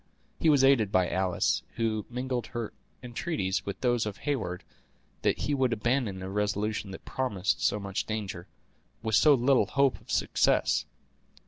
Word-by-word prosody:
He 160 - +3
was 145 -3 +5
aided 125 -7 +4
by 90 -1 +2
Alice, 95 -1 +1
who 110 -2 -1
mingled 125 0 -3
her 120 -3 -5 0.3
entreaties 120 - -2
with 100 - -4
those 120 -3 +1
of 100 - -5
Heyward 130 -11 -3 0.6
that - - +2
he 145 - 0
would 130 -3 +2
abandon 115 -4 -1
a 95 - -5
resolution 105 0 -1
that 95 - -9
promised 100 -11 -1
so 105 +6 +2
much 100 -1 -3
danger, 100 -5 -4 0.6
with 110 -1 -2
so 145 +7 +6
little 125 -4 +3
hope 140 +2 +2
of - - -23
success. - - +2
110 Hz, 155 wpm, -29 LUFS, 100-130 Hz, 0.6 s, so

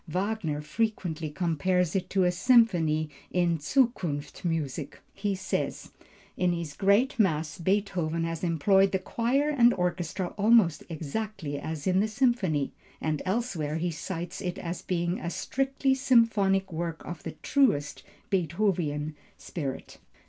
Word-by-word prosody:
Wagner 180 -3 -2
frequently 170 -4 -2
compares 175 +2 0
it 190 - -1
to 190 -1 +2
a 180 - +3
symphony. 180 -7 +3 0.2
In 175 -2 +1
Zukunftsmusik, 160 - -1 0.2
he 200 0 -1
says: 190 0 -3 0.4
"In 180 -1 +1
his 170 -3 -4
Great 205 - +2
Mass 160 -6 +1
Beethoven 175 -3 0
has 165 0 -3
employed 190 +4 +3
the - - +4
choir 245 +9 0
and 245 -4 +5
orchestra 180 0 -2
almost 205 -7 +4
exactly 165 -1 -4
as 155 -1 -5
in 185 0 +3
the 210 - +2
symphony;" 215 - +1 0.3
and 155 -2 -1
elsewhere 185 -8 -1
he 170 +2 -1
cites 170 +2 -5
it 180 -2 -3
as 170 0 -5
being 175 0 -1
a 170 - -3
"strictly 270 +6 0
symphonic 220 -8 +3
work 165 0 -4
of 170 -2 -6
the - - -6
truest 145 - +2 0.3
Beethovenian 170 -4 0 0.2
spirit." 140 -6 -6
180 Hz, 130 wpm, -28 LUFS, 160-205 Hz, 0.4 s, and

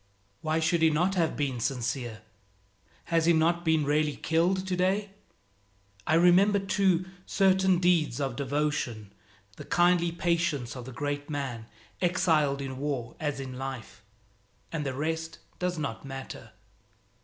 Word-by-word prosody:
Why 155 +1 0
should 165 +1 +1
he 160 - +6
not 175 +5 +1
have 170 -4 0
been 135 -4 -1
sincere? 120 -3 -3 0.9
Has 165 0 +3
he 170 - +6
not 170 +2 +2
been 160 -3 +2
really 150 0 +1
killed 180 +4 +1
today? 190 +2 0 1.0
I 155 - +3
remember, 180 +4 +5
too, 190 -2 +1 0.2
certain 190 -1 +3
deeds 170 -8 +2
of 135 -3 -2
devotion, 135 -7 -2 0.4
the - - -8
kindly 175 -1 +3
patience 170 -7 -1
of 125 -2 -7
the 130 - -8
great 145 +3 -4
man, 130 -6 -4 0.3
exiled 160 -6 +2
in 130 -1 -6
war 135 -5 -3
as 145 -3 -2
in 130 -1 -6
life 130 -4 -7 0.7
and 150 -3 -3
the 130 - -3
rest 160 +2 -3 0.2
does 180 -1 -1
not 140 -7 -4
matter. 135 -1 -8
155 Hz, 140 wpm, -28 LUFS, 135-175 Hz, 1.0 s, he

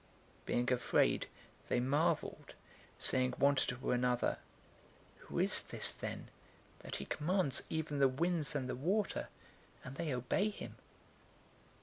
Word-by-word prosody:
Being 125 +1 +1
afraid 125 - +2 0.4
they 125 - +2
marveled, 140 +6 0 0.4
saying 130 -1 +3
one 140 +1 +5
to 125 -1 -1
another, 125 0 +1 0.8
"Who - - -8
is - - +4
this, - - +1
then, - - -6 0.5
that - - -6
he 70 - -4
commands 165 - 0
even 155 -2 -2
the 135 - +6
winds 155 +2 0
and 130 -3 -1
the 130 - -2
water, 190 - 0 0.5
and 130 +1 -8
they 165 -3 -2
obey 130 - +1
him?" 210 - -8
135 Hz, 125 wpm, -36 LUFS, 125-160 Hz, 0.8 s, the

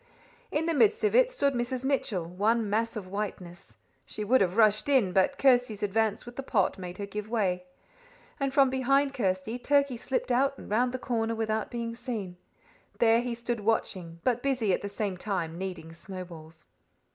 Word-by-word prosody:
In 300 +2 0
the 335 - +1
midst 435 +8 +3
of 425 - +2
it - - +5
stood 280 - +1
Mrs. 245 +1 -2
Mitchell, 255 -10 0
one 210 +6 +1
mass 225 +3 0
of 210 -4 -5
whiteness. 185 - -6 0.3
She 210 - -6
would 250 +5 +3
have 185 +1 +1
rushed 215 +3 +4
in, 240 -10 +3
but 190 +9 +2
Kirsty's 245 -6 +3
advance 215 +1 0
with 240 0 -11
the - - -2
pot 205 -8 0
made 180 -1 -7
her 200 - -4
give 210 +1 -6
way, 185 -6 0 0.7
and 275 -1 0
from 270 -1 +4
behind 275 +2 +2
Kirsty 200 +1 -1
Turkey 280 -1 +2
slipped 255 +1 -2
out 270 +3 +2
and - - -11
round 245 +4 +2
the 255 - -3
corner 230 -3 -1
without 220 -1 -1
being 235 -1 -4
seen. 230 -7 -5 0.6
There 230 0 +4
he 240 -1 -3
stood 235 0 -3
watching, 185 -6 -1
but 245 -1 +1
busy 250 -8 +1
at - - 0
the 200 - -4
same 200 -2 -3
time 175 -4 -3
kneading 180 -4 -6
snowballs. 170 -3 -10
225 Hz, 185 wpm, -28 LUFS, 190-255 Hz, 0.7 s, it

